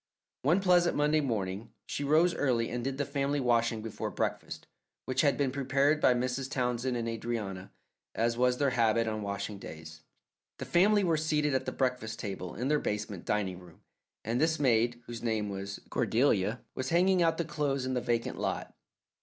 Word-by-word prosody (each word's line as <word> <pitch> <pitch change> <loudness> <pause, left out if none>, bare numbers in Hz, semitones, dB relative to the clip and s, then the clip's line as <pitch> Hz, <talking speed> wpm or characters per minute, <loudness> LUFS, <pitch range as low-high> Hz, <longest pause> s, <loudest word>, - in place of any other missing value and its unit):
One 170 +8 +3
pleasant 180 -2 +4
Monday 150 +1 +3
morning 105 -4 -3
she - - -3
rose 160 +5 +4
early 120 -5 0
and 120 0 -3
did 135 +1 -2
the 145 - -1
family 140 0 -1
washing 115 -3 +1
before 115 - -4
breakfast, - - -3 0.4
which 130 0 +1
had 140 -4 +3
been 140 -2 +1
prepared 140 +2 +1
by 125 - +5
Mrs. 125 +2 -2
Townsend 125 -1 -1
and 115 -1 -2
Adrianna, 110 -5 -4 0.5
as 115 +1 +1
was 125 +1 +2
their 140 -1 +2
habit 115 -1 +2
on 110 -1 -2
washing 100 0 -4
days. 80 -2 -10 0.6
The - - -5
family 200 +4 +4
were 165 -3 +2
seated 150 -2 +1
at 130 - -1
the - - 0
breakfast 125 -4 -1
table 95 -3 -5
in 125 +5 -2
their 150 +1 +3
basement 105 -3 -4
dining 95 -4 -1
room, 90 -3 -16 0.4
and 115 +4 0
this 160 0 +2
maid, 120 -2 +2
whose 120 -1 -7
name 110 -3 -1
was 100 0 -5
Cordelia, 110 -2 +1
was 130 0 -3
hanging 180 +2 +3
out 165 -1 +3
the 170 - -1
clothes 145 -4 -1
in 130 - -2
the 125 - 0
vacant 120 -1 -1
lot. - - -3
125 Hz, 185 wpm, -30 LUFS, 110-145 Hz, 0.6 s, by